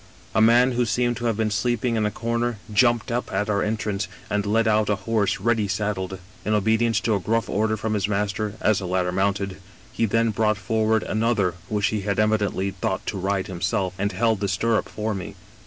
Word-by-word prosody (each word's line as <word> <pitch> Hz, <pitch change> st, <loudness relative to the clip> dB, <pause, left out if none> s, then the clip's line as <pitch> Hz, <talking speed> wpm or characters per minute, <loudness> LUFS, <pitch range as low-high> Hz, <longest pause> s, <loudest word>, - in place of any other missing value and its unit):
" -, -, -25 dB
A 110 Hz, -, +3 dB
man 120 Hz, +3 st, +5 dB
who 125 Hz, 0 st, +1 dB
seemed 120 Hz, +1 st, +1 dB
to 120 Hz, -, -4 dB
have 115 Hz, -3 st, +1 dB
been 110 Hz, -1 st, 0 dB
sleeping 120 Hz, +3 st, 0 dB
in 110 Hz, -1 st, +1 dB
a -, -, 0 dB
comer 115 Hz, +1 st, -2 dB, 0.2 s
jumped 120 Hz, +1 st, +3 dB
up 120 Hz, +1 st, -2 dB
at 105 Hz, +2 st, 0 dB
our 100 Hz, -1 st, +1 dB
entrance, 105 Hz, -2 st, -1 dB, 0.2 s
and 105 Hz, 0 st, 0 dB
led 115 Hz, +2 st, +2 dB
out 110 Hz, -1 st, +2 dB
a 105 Hz, -, +3 dB
horse 110 Hz, -3 st, +1 dB
ready 115 Hz, -3 st, +1 dB
saddled. 95 Hz, -1 st, -2 dB, 0.3 s
In 105 Hz, -, +1 dB
obedience 110 Hz, +1 st, +2 dB
to 115 Hz, -1 st, +1 dB
a 100 Hz, -, +1 dB
grulBE 115 Hz, +4 st, 0 dB
order 110 Hz, +1 st, +1 dB
from 110 Hz, +1 st, -2 dB
his 100 Hz, -3 st, 0 dB
master, 105 Hz, +1 st, -1 dB
as 110 Hz, -2 st, +3 dB
the 95 Hz, -, -5 dB
latter 90 Hz, 0 st, 0 dB
mounted, 100 Hz, 0 st, -1 dB, 0.3 s
he 115 Hz, -, 0 dB
then 115 Hz, +2 st, +2 dB
brought 110 Hz, 0 st, +1 dB
forward 110 Hz, +1 st, +1 dB
another 110 Hz, -4 st, +1 dB, 0.2 s
which 105 Hz, -2 st, 0 dB
he 105 Hz, -2 st, -2 dB
had 100 Hz, 0 st, -1 dB
evidently 105 Hz, -3 st, +1 dB
thought -, -, -3 dB
to -, -, -3 dB
ride 95 Hz, 0 st, 0 dB
himself 95 Hz, +1 st, -1 dB
and 100 Hz, +1 st, 0 dB
held 115 Hz, -2 st, +1 dB
the 100 Hz, -, -1 dB
stirrup 110 Hz, +4 st, 0 dB
for 110 Hz, +1 st, -3 dB
me. 95 Hz, -2 st, -6 dB
105 Hz, 215 wpm, -24 LUFS, 100-115 Hz, 0.3 s, man